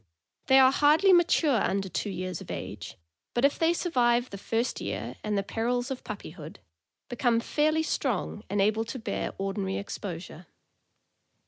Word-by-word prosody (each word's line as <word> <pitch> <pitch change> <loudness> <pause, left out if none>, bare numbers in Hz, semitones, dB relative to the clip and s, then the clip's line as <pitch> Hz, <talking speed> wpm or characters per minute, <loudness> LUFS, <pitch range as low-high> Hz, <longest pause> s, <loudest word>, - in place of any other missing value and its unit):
They 265 - +6
are 260 -1 +7
hardly 305 +7 +5
mature 325 - +4
under 195 0 0
two 190 +3 -3
years 185 -2 -4
of - - -11
age, - - -6 0.4
but 240 +3 +3
if 280 - +1
they 325 0 +4
survive 245 -8 +1
the 200 - -6
first 230 +4 -1
year 105 +5 -4
and 210 -1 -1
the 200 - 0
perils 245 +5 -1
of 260 - -5
puppyhood, 175 -4 -8 0.5
become 240 -1 +1
fairly 310 +6 +1
strong 240 - -2
and 200 +1 -1
able 215 +3 +2
to 230 - -6
bear 225 - -3
ordi 195 +1 -4
nary 190 -1 -2
exposure. 180 -4 -7
230 Hz, 160 wpm, -28 LUFS, 195-265 Hz, 0.5 s, are